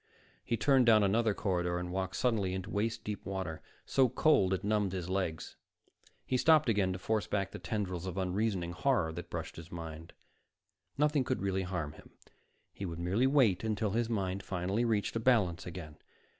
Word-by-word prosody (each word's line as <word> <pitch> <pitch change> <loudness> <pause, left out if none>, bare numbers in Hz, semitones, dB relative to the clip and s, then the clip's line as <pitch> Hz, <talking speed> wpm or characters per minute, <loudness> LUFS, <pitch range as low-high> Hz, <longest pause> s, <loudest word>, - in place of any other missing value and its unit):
He 115 - -1
turned 130 +1 +4
down 110 -2 +6
another 110 +1 +2
corridor 90 -3 0
and 90 0 -4
walked 95 +1 -2
suddenly 100 -4 +1
into 95 +2 -5
waist 110 +2 -1
deep 105 -1 -5
water, 95 -5 -4 0.2
so 130 -2 +3
cold 110 -9 +3
it 95 +1 -1
numbed 105 -2 +1
his 90 -1 -4
legs. 90 -4 -2 0.7
He 130 - +1
stopped 155 -1 +5
again 100 -4 +2
to - - -4
force 110 +3 -1
back 100 -2 -1
the - - -7
tendrils 95 -5 -3
of 90 0 -5
unreasoning 95 -1 -1
horror 90 -5 +1
that 85 +1 -7
brushed - - -5
his 80 0 -10
mind. 80 -1 -8 0.8
Nothing 150 -1 +3
could 130 -4 -2
really 95 -1 0
harm 90 -5 -3
him. - - -15 0.6
He - - -8
would 85 -3 -4
merely 95 +9 +1
wait 125 -10 +3
until 110 -2 0
his 115 +2 0
mind 95 -3 -1
finally 95 +5 -1
reached 110 -2 0
a - - +1
balance 105 -10 +2
again. 80 -3 -8
100 Hz, 185 wpm, -32 LUFS, 90-115 Hz, 0.8 s, down